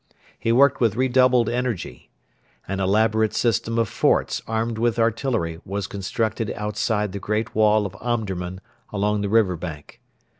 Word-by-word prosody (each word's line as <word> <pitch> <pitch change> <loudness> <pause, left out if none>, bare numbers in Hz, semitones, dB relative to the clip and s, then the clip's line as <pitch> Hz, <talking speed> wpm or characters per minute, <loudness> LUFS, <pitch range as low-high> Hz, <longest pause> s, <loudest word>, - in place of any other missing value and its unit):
He 115 - 0
worked 135 +3 +4
with 115 -4 +2
redoubled 125 -1 +3
energy. 120 - -3 0.6
An 95 0 -3
elaborate 110 +3 +2
system 115 -1 0
of 115 -1 +2
forts - - +1
armed 115 0 -2
with 120 0 +1
artillery 115 -7 0
was 100 0 -3
constructed 105 +3 -2
outside 105 0 -1
the 100 - -5
great 105 +3 -2
wall 105 -1 +3
of 95 -1 -6
Omdurman 95 -6 -3 0.3
along 105 0 0
the 100 - -2
river 105 -4 +3
bank. 80 -4 -8
110 Hz, 145 wpm, -23 LUFS, 100-115 Hz, 0.6 s, worked